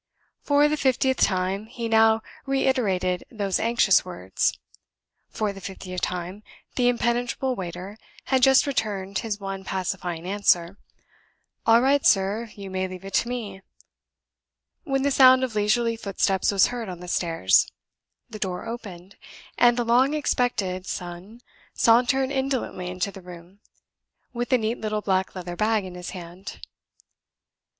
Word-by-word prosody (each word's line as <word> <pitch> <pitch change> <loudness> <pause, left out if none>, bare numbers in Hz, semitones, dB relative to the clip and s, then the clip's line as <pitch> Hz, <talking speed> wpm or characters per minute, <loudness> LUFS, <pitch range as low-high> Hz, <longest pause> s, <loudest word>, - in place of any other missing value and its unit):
For 290 0 +4
the 305 +1 0
fiftieth 265 -1 +1
time, 190 +2 +1
he 235 0 -5
now 225 0 +4 0.2
reiterated 210 -10 0
those 200 -5 -1
anxious 230 +1 +3
words. - - -2 0.7
For 210 -2 -2
the 195 - -11
fiftieth 185 -1 -6
time, 180 +3 -4 0.3
the 245 -1 +2
impenetrable 245 +2 0
waiter 185 +2 -7 0.3
had 265 -1 +1
just 265 +1 +6
returned 200 -8 -2
his 215 -3 -4
one 195 -1 -5
pacifying 180 -3 -3
answer, 190 -2 +1 0.9
"All 230 +1 +6
right, 280 +1 +3
sir; 205 +4 +2
you 195 -2 -8
may 185 0 -1
leave 185 0 -9
it 195 - -8
to 235 - +1
me" 210 -6 -5 1.2
when 270 -3 0
the 280 - +2
sound 260 -1 +7
of 255 -3 -2
leisurely 230 +3 +1
footsteps 195 -3 0
was 195 -2 +5
heard 235 -4 -5
on 180 -2 -7
the 180 - -9
stairs; 165 - +2 0.6
the 215 - -9
door 180 -2 -3
opened; 200 -5 -8 0.4
and 240 0 +4
the 240 - 0
long 255 +5 +3
expected 205 -10 -1
son 180 +6 -7 0.3
sauntered 255 +3 +3
indolently 265 -9 -2
into 185 +3 -3
the 195 - -11
room, 180 +2 -13 0.7
with 240 +2 -3
a 255 - +5
neat 225 0 -2
little 215 -1 -2
black 190 -2 0
leather 175 -1 -6
bag 215 0 +1
in 185 - -8
his 180 0 -7
hand. 180 +1 -9
205 Hz, 145 wpm, -25 LUFS, 185-240 Hz, 1.2 s, sound